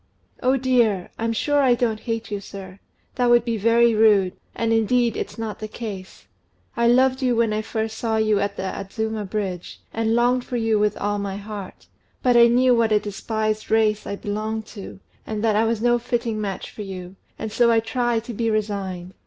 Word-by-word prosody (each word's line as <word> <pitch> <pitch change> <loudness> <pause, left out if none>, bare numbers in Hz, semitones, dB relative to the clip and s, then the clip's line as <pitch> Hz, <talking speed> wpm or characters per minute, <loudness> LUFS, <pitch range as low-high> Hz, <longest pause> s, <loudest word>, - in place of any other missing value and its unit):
"Oh, 260 +2 +3
dear! 240 -8 +1
I'm 230 0 0
sure 290 +6 +1
I 255 -3 +4
don't 230 -3 0
hate 225 -1 -4
you, 205 - -2
sir. 195 -1 -10 0.3
That 245 -2 +1
would 240 -1 +5
be 230 -2 -1
very 230 +2 +4
rude; 210 -4 +4 0.2
and, 225 0 0
indeed, 230 +1 +2
it's 205 - -5
not 225 -2 -5
the 215 - -5
case. 210 -4 -8 0.5
I 235 - +2
loved 260 +2 +4
you 250 -2 +2
when 230 -2 +2
I 215 - 0
first 220 0 -4
saw 225 -2 0
you 215 -2 +2
at 200 0 -2
the - - -3
Adzuma 215 +3 -3
Bridge, 190 -4 -4
and 225 0 +1
longed 245 +1 +2
for 245 - -4
you 225 -2 +1
with 210 0 +1
all 205 0 -1
my 200 -1 -4
heart; 205 -2 -8 0.4
but 250 -1 +4
I 235 0 +8
knew 250 +2 +4
what 230 -2 +2
a 210 - +4
despised 215 +1 -3
race 215 -1 +2
I 200 - -3
belonged 215 +2 -3
to, 200 -2 -9 0.3
and 215 -1 -3
that 220 -2 +2
I 220 +2 +3
was 225 0 -1
no 240 0 +3
fitting 235 -2 -2
match 195 -3 -4
for - - -9
you, 185 -2 -7 0.2
and 220 - -5
so 235 +2 +3
I 230 -1 +4
tried 235 0 -1
to 235 - -7
be 230 +1 -1
resigned. 195 -4 -3
220 Hz, 205 wpm, -23 LUFS, 205-235 Hz, 0.5 s, I